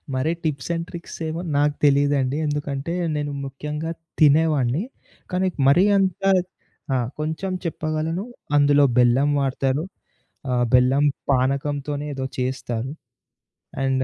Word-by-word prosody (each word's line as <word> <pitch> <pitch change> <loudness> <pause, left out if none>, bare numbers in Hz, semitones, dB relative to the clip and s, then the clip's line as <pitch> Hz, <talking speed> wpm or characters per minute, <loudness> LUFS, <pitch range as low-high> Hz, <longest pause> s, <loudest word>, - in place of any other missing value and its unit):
మరి 130 +5 +1
tips 145 -4 -2
and 165 0 -2
tricks 170 -1 -8
ఏమో 160 +2 -3 0.2
నాకు 145 0 +3
తెలీదండి. 140 -1 +3
ఎందుకంటే 145 +1 -2 0.2
నేను 145 -1 -2
ముఖ్యంగా 150 +4 -5 0.3
తినేవాన్ని. 150 -1 +3 0.5
కానీ, 185 +1 +1 0.2
మరీ 175 +8 +6
అంత 190 -1 0 0.7
ఆ! - - +3 0.2
కొంచెం 160 +5 -2
చెప్పగలను 160 +2 -2 0.3
అందులో 145 0 +5
బెల్లం 125 +4 +4
వాడతారు. 135 +2 0 0.7
ఆహ్, 125 -1 +2
బెల్లం 130 +3 +4 0.3
పానకంతోనే 140 +2 0
ఏదో 135 -1 -3
చేస్తారు. 125 -1 -2 0.9
అండ్ 135 -1 +1
145 Hz, 110 wpm, -23 LUFS, 135-155 Hz, 0.9 s, మరీ